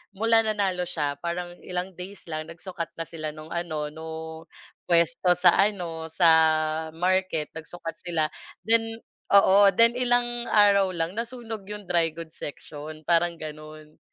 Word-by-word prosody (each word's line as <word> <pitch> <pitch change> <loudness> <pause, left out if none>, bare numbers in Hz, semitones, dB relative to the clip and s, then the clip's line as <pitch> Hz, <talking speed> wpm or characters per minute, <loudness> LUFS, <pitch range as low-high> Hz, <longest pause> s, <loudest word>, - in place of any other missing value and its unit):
mula 225 +2 +4
nanalo 195 -5 -1
siya 145 -4 -2
parang 175 0 -4
ilang 180 +1 -4
days 185 +3 -10
lang 155 -1 -5
nagsukat 170 0 -6
na 165 - -4
sila 155 -2 -6
no'ng 155 +1 -11
ano 155 -3 -3
nung 160 0 -7 0.7
puwesto 170 +1 +3
sa 180 -1 +6
ano, 175 -6 0
sa 170 +1 +3 0.7
market 180 -3 0
nagsukat 165 +1 -7
sila 165 -4 -1 0.3
then 225 0 +2 0.4
oo. 200 0 +7
Then 230 +1 +6
ilang 240 -1 +1
araw 200 -2 +5
lang 170 +6 -2
nasunog 230 -4 -6
'yong 210 0 -7
dry 165 -3 +1
goods 165 -1 -10
section, 155 +1 -8
parang 170 +1 +2
gano'n. 155 0 -10
175 Hz, 140 wpm, -26 LUFS, 160-200 Hz, 0.7 s, oo